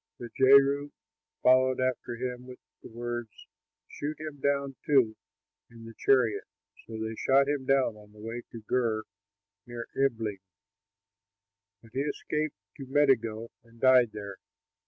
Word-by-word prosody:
But 120 -2 -9
Jehu 140 +2 +5 0.5
followed 130 0 +4
after 130 -2 -1
him 125 +1 -5
with 125 -1 -10 0.2
the - - -11
words, 120 0 -5 0.6
"Shoot 150 +1 -5
him 155 -2 -7
down, 140 -1 0
too, 130 -7 +3 0.5
in 115 -1 -13
the 115 - -10
chariot." 120 -6 +2 0.4
So 115 - -7
they 110 0 -3
shot 135 +4 +3
him 140 -2 -2
down 135 -5 +2
on 105 -1 -16
the 105 - -20
way 115 +2 -5
up - - -14
to 115 - -9
Gur, 110 -1 0 0.6
near 120 -1 -7
Ibleam, 115 -7 0 1.4
but 115 - -17
he 130 - -2
escaped 150 0 -2 0.2
to 135 - -8
Megiddo 115 -5 +1
and 115 0 -21
died 130 -2 +6
there. 100 -2 -7
125 Hz, 145 wpm, -29 LUFS, 115-135 Hz, 1.4 s, died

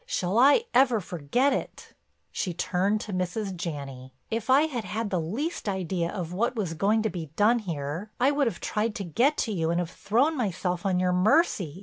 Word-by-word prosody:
Shall 195 - 0
I 285 - +6
ever 250 -4 +4
forget 190 - 0
it!" - - -5 0.4
She 180 -3 -3
turned 195 +4 0
to 205 - -6
Mrs. 185 +2 -2
Janney: 135 -6 -6 0.2
"If 225 +1 -3
I 270 +3 +6
had 265 -8 -2
had 210 +2 -3
the 180 -3 0
least 225 - -3
idea 185 -3 -2
of 175 -3 -5
what 235 +6 0
was 195 -7 -2
going 210 +6 +1
to 220 - +1
be 165 -3 -5
done 225 +4 +4
here, 165 0 -4
I 265 +3 +4
would 285 -2 +1
have 190 - -3
tried 215 +1 -1
to 205 - -4
get 245 - +1
to 225 - -4
you 165 -5 -1
and 170 +1 +1
have 175 -1 -3
thrown 255 - +1
myself 185 - -2
on 185 -2 +1
your 180 0 +1
mercy. 190 - +2
195 Hz, 205 wpm, -27 LUFS, 175-235 Hz, 0.4 s, I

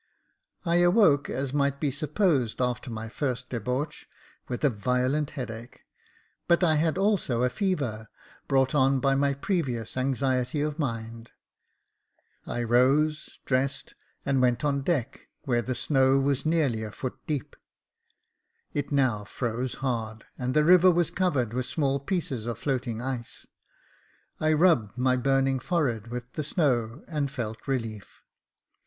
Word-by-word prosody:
I 170 0 +3
awoke, 175 -5 +4
as 135 0 -2
might 140 -1 +1
be 145 -2 0
supposed, 150 - 0
after 125 0 -1
my 115 -1 -5
first 125 +1 -3
debauch, 125 +6 -3 0.4
with 125 +2 -4
a 145 - +5
violent 125 +7 0
headache, 115 -2 -7 0.7
but 170 +1 +4
I 160 -3 +4
had 160 +2 +1
also 190 - +1
a 125 - +2
fever, 125 - -2 0.4
brought 135 -1 +2
on 135 -1 +3
by 135 0 +2
my 140 0 +2
previous 135 - -2
anxiety 130 +1 0
of 150 +1 -2
mind. 115 -4 -4 1.2
I 120 - -2
rose, 135 +6 +2
dressed, 135 +1 -1 0.3
and 135 -2 +2
went 125 +2 +2
on 140 -1 +1
deck, 135 -5 -2
where 120 -5 0
the 125 +2 -3
snow 135 +1 +3
was 140 +1 0
nearly 150 -9 +1
a 110 - -4
foot 130 +3 -6
deep. 145 -6 -3 1.2
It 145 0 -2
now 130 -7 +2
froze 120 +3 -3
hard, 110 -3 -3
and 125 0 -3
the 150 - +5
river 180 +2 +7
was 170 -2 +2
covered 145 - 0
with 125 0 -2
small 140 -3 0
pieces 140 - -3
of 120 -2 -3
floating 125 -3 -2
ice. 125 -3 -5 0.9
I 155 0 +2
rubbed 150 - +3
my 130 0 +2
burning 135 +1 +2
forehead 125 - -1
with 125 +1 -7
the 155 - -3
snow, 130 -5 0
and 150 -4 -1
felt 115 -4 -6
relief. 115 -6 -4
135 Hz, 145 wpm, -27 LUFS, 120-150 Hz, 1.2 s, river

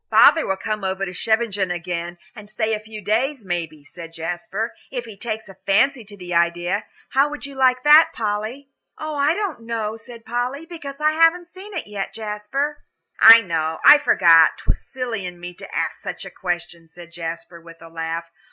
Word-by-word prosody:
"Father 325 - +6
will 190 - -1
come 215 0 -4
over 190 +1 -2
to 180 - -7
Scheveningen 215 -2 0
again 175 0 -4 0.2
and 210 -1 -11
stay 220 +1 -1
a 215 - -1
few 215 0 -10
days, 235 +3 -1
maybe," 165 -4 -4
said 165 +3 -11
Jasper, 175 - -4 0.2
"if 245 -2 -5
he 220 -3 -10
takes 220 +1 -5
a 195 - -14
fancy 240 +6 +3
to 205 0 -11
the 180 -2 -7
idea. 175 +4 0 0.2
How 275 +4 +3
would 295 0 -7
you 280 - -9
like 255 -1 +2
that, 300 +2 +7
Polly?" 225 +5 -4 0.3
"I 305 0 0
don't 400 - -3
know," 225 -2 -3
said 230 +1 -13
Polly, 250 +6 -3
"because 300 -5 -9
I 305 0 +3
haven't 330 +2 +3
seen 385 +3 -11
it 335 - -3
yet, 205 -2 -5
Jasper." 225 +8 -3 0.4
"I 230 0 +10
know 160 -5 -2
I 295 - +10
forgot 165 - +5
'twas - - -3
silly 245 -6 -5
in 180 -1 -7
me 175 0 -8
to - - -11
ask - - -2
such - - -6
a - - -9
question," 175 -2 -5
said 170 0 -14
Jasper, 170 0 -7
with 165 0 -15
a 165 - -12
laugh. 165 0 -4
215 Hz, 190 wpm, -21 LUFS, 175-265 Hz, 0.4 s, I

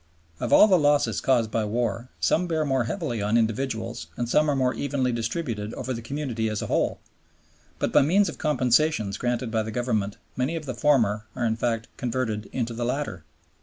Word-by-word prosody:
Of - - -3
all - - +8
the 185 -4 +5
losses 145 -1 +2
caused 120 -5 +2
by 115 - 0
war 115 +2 -2
some 180 +2 +2
bear 160 -2 0
more 135 -4 +1
heavily 125 - -3
on 105 +3 +2
individuals 115 0 -1
and 120 - -1
some 150 +5 +3
are 145 - +2
more 130 -1 +1
evenly 130 0 -1
distributed 115 -2 -3
over 130 +1 -3
the 115 - -5
community 120 -3 -2
as 105 -1 -2
a - - -3
whole; - - 0 0.8
but - - -1
by - - +7
means 190 +8 +3
of - - -6
compensations 130 -6 +2
granted 120 -1 -1
by 110 -1 +1
the 110 - -4
Government 110 -4 -1 0.2
many 130 +6 -1
of 160 -2 -5
the 130 - -3
former 115 -6 +2
are 120 - -1
in 110 -1 +1
fact 115 -1 -1
converted 115 -4 -2
into 120 -2 -2
the 120 +1 -3
latter. 125 - -2
120 Hz, 200 wpm, -25 LUFS, 110-140 Hz, 0.8 s, all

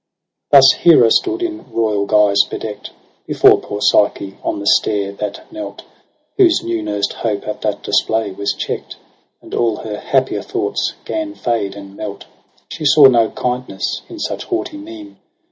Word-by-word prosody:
Thus 135 -1 +8
Hera 150 -9 +6
stood 360 -1 +1
in 330 -2 -5
royal 105 -3 0
guise 105 -2 +4
bedeckt 105 -2 -6 0.4
Before - - +5
poor 105 0 -6
Psyche 100 -1 +2
on - - -2
the 100 - -6
stair 100 -1 +2
that 100 +1 -6
knelt. 320 -1 -7 0.5
Whose 360 -4 +4
new 115 -1 -2
nursed 105 -1 -2
hope 105 -3 -3
at 105 - -5
that - - -2
display 110 -2 0
was 100 +1 -3
checkt, - - -5 0.5
And - - -13
all 115 -2 +1
her 105 -1 -6
happier 135 -1 0
thoughts 395 +2 -2
gan 315 -1 -4
fade 105 -5 -2
and 100 -1 -11
melt. 100 -1 -7 0.5
She 160 - -6
saw 145 0 +6
no 120 -4 +5
kindness 125 -6 -3
in 345 - -9
such - - -4
haughty 345 -4 -3
mien. 315 0 -11
115 Hz, 160 wpm, -17 LUFS, -, 0.5 s, Thus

